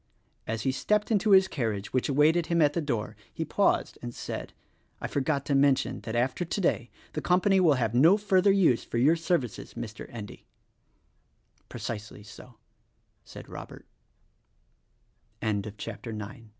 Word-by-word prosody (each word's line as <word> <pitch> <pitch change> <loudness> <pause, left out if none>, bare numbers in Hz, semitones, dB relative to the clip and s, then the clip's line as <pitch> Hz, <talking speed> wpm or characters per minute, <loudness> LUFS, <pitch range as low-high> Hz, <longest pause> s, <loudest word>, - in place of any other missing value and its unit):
As 110 0 -3
he 135 - +1
stepped 210 - 0
into 215 0 +2
his 190 -1 +7
carriage, 110 - -3
which 130 +2 0
awaited 155 +4 +3
him 170 0 +1
at 145 -2 +4
the 170 - -1
door, 120 -8 -3 0.2
he - - -4
paused - - +1
and - - -7
said, - - -6 0.5
"I - - -5
forgot 140 0 -1
to 145 - 0
mention 135 -1 +2
that 110 - -5
after 130 +8 0
today 170 - -1 0.2
the 155 - -3
company 185 +3 +3
will 165 -6 +5
have 115 -3 -1
no 160 +11 +6
further 200 -1 +3
use 180 -12 +3
for - - -4
your 145 +8 +4
services, 165 - -2
Mr. 110 -1 -7
Endy." 105 -4 -9 1.2
"Precisely 105 -2 -6
so!" 115 +4 -13
145 Hz, 135 wpm, -28 LUFS, 120-175 Hz, 1.2 s, his